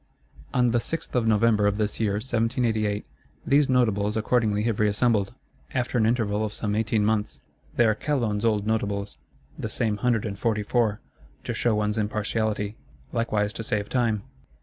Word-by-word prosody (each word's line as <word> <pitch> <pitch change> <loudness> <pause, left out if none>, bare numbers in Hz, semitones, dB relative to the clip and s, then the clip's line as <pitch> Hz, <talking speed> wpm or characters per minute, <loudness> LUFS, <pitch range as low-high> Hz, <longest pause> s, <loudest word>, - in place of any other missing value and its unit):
On 125 -2 +3
the 120 - +2
6th 165 +7 -5
of 120 -3 +1
November 110 -1 +3
of 100 0 +1
this 105 -1 -1
year 105 -3 +1
1788, 115 -2 0 0.4
these 140 0 +3
Notables 110 -5 +2
accordingly 110 -2 +1
have 115 -2 -1
reassembled; 105 -1 +2 0.4
after 125 0 -1
an 110 - +3
interval 110 -3 +1
of 105 -1 -3
some 105 -2 -2
eighteen 110 0 +1
months. 105 -1 0 0.4
They 120 - +4
are 110 - +4
Calonne's 115 -4 -1
old 105 -3 +1
Notables, 100 -2 -2 0.4
the - - -3
same 110 -3 -1
Hundred 115 0 +1
and 100 -2 -5
Forty 110 -3 0
four,—to 110 -1 -3
show 120 -3 +1
one's 105 +1 0
impartiality; 105 0 -1 0.4
likewise 110 -3 0
to 115 - -5
save 105 -1 -1
time. 115 -5 +1
110 Hz, 160 wpm, -25 LUFS, 105-115 Hz, 0.4 s, They